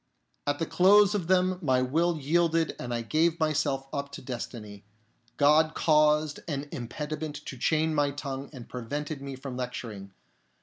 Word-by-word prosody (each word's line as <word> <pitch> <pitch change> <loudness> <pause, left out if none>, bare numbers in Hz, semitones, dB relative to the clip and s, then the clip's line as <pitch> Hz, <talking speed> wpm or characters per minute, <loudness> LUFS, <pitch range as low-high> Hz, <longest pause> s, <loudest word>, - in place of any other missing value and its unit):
At 145 0 +1
the 165 - -1
close 200 +4 +5
of 190 -6 -2
them 185 0 +2
my 130 -5 +2
will 165 +6 +1
yielded 165 +2 +1
and 120 - -5
I 120 -1 -2
gave 160 +7 +1
myself 155 -3 0
up 140 0 -3
to - - -7
destiny. 115 -5 -7 0.5
God 155 +2 +4
caused 150 -1 +3
an 145 -2 -3
impediment 150 +3 -5
to - - -6
chain 155 +5 +1
my 145 -1 +2
tongue 140 -1 -5
and 130 -5 -10
prevented 145 +4 -5
me 140 -1 -6
from 130 -1 -7
lecturing. 115 -6 -6
145 Hz, 160 wpm, -28 LUFS, 130-160 Hz, 0.5 s, close